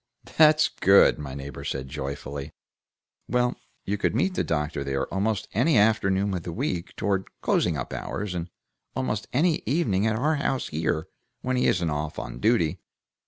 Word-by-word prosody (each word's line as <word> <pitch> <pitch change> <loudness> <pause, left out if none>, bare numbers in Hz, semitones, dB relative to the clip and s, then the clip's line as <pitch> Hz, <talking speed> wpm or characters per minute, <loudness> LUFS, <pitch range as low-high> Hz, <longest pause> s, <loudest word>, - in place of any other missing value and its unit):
"That's 155 0 +6
good!" 95 -4 +5
my 70 -2 -6
neighbor 70 +1 -7
said, 65 -1 -3
joyfully. 70 0 -5 0.8
"Well, 125 0 +2 0.3
you 100 +1 -1
could 105 - +1
meet 185 +10 +1
the - - 0
doctor 75 -2 -1
there 70 0 -1
almost 100 +1 0
any 125 - +3
afternoon 100 -2 +3
of 90 - -2
the 85 - -6
week, 85 +1 -3
toward 100 -2 -1
closing 85 -4 +1
up 65 - -5
hours, 105 -2 -4
and 85 0 -4 0.5
almost 110 -5 -2
any 160 +5 +2
evening 110 - +1
at 110 - +1
our 150 +5 +1
house 135 -2 -1
here, 80 0 -1 0.3
when 130 0 -1
he 125 - +2
isn't 85 -4 +1
off 75 +1 -3
on - - -6
duty. 110 - +2
95 Hz, 165 wpm, -26 LUFS, 75-120 Hz, 0.8 s, That's